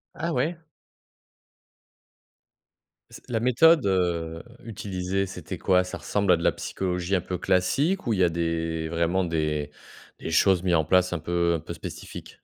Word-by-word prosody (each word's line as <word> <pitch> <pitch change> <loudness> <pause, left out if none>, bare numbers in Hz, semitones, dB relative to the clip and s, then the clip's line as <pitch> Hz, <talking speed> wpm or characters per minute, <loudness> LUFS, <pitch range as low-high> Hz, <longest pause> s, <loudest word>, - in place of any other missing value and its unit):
Ah, 170 - -2
ouais? 155 +6 0 2.5
C - - -12
La 115 -2 0
méthode, 130 +4 +5
heu, 85 -3 0 0.2
utilisée, 95 -3 -3
c'était 95 - -7
quoi? 90 -1 +3
Ça 90 - -6
ressemble 100 -2 0
à - - +3
de 85 - -5
la - - +4
psychologie 90 0 -2
un 90 - +1
peu 90 - -4
classique 135 - +1
ou 115 - +2
il 95 - -1
y 95 - +5
a 85 - +4
des 80 -1 -2
vraiment, 85 +3 +1
des 75 -3 -1 0.5
des - - -5
choses 95 +1 +4
mises 90 -2 +2
en 80 -2 +2
place, 90 +2 +3
un 85 - -2
peu 85 +1 0
un - - -2
peu 80 - -7
spécifiques? - - -8
90 Hz, 170 wpm, -26 LUFS, 85-100 Hz, 2.5 s, méthode